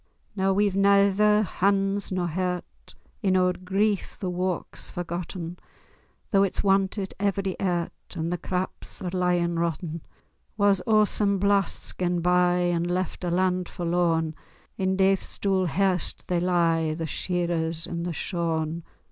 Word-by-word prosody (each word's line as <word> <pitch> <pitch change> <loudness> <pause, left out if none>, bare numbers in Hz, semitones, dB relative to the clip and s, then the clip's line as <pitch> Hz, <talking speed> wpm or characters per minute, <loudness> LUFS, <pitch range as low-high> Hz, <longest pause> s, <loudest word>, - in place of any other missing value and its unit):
Noo 195 -1 +2
we've 200 0 +2
naether 200 +2 +4
hands 195 +1 +1
nor 185 -1 0
hairt— 180 +1 -4 0.3
In 190 -3 +3
oor 180 0 +3
grief 195 +3 -1
the 185 -2 -2
wark's 180 0 -3
forgotten, 175 0 -5 0.7
Though 195 - +4
it's 195 -2 +1
wantit 195 0 +1
every 195 -1 0
airt, 175 -3 -1 0.2
And 165 +1 -2
the 180 - -3
craps 185 +2 -4
are 180 - -3
lyin' 175 -2 +1
rotten. 165 0 -2 0.6
War's 200 -2 +3
awsome 210 -2 +3
blast's 200 -1 +1
gane 175 -1 0
bye, 180 0 +3
And 170 +1 -1
left 185 +1 -2
a 175 - 0
land 180 0 +1
forlorn; 170 -2 0 0.4
In 190 0 0
daith's 195 0 +1
dool 190 -2 +1
hairst 180 +1 0
they 175 -1 +2
lie, 165 -3 +2
The 165 0 -3
shearers 170 -1 -1
and 170 0 -4
the 175 - -2
shorn. 165 -1 -2
180 Hz, 140 wpm, -26 LUFS, 170-195 Hz, 0.7 s, naether